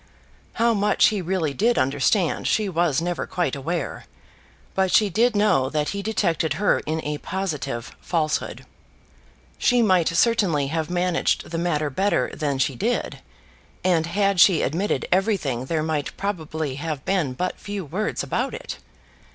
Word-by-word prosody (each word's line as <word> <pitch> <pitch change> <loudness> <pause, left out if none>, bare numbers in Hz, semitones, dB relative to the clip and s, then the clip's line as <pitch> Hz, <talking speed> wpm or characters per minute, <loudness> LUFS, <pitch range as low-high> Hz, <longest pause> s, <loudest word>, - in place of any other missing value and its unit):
How 235 0 +2
much 205 -1 +3
he 210 -3 -2
really 170 -4 -1
did 235 +9 +2
understand 145 +6 +1
she 215 -2 +1
was 170 -4 +1
never 175 -1 -2
quite 175 -4 -1
aware; 155 +3 -4 0.7
but 190 -1 +1
she 210 -3 +4
did 230 +5 +2
know 205 -11 +3
that 150 0 -1
he 200 - -3
detected 175 -6 0
her 205 - +2
in 160 +1 -2
a 150 0 -2
positive 150 -11 -4
falsehood. 155 -3 -2 0.9
She 245 -1 +3
might 185 -6 +3
certainly 170 - +2
have 160 +1 -2
managed 180 -1 0
the 165 - -2
matter 155 -4 0
better 195 +9 +1
than 145 -3 -1
she 135 +1 +1
did; 230 - -2 0.6
and 170 -3 +2
had 195 +1 +1
she 175 -2 +6
admitted 180 +9 -1
everything 180 - +1
there 155 +2 -1
might 155 -2 -2
probably 160 -8 -3
have 150 -2 -4
been 175 -9 0
but 180 +8 -3
few 200 -3 -5
words 190 +9 -2
about - - -2
it. - - -7
175 Hz, 150 wpm, -23 LUFS, 150-200 Hz, 0.9 s, she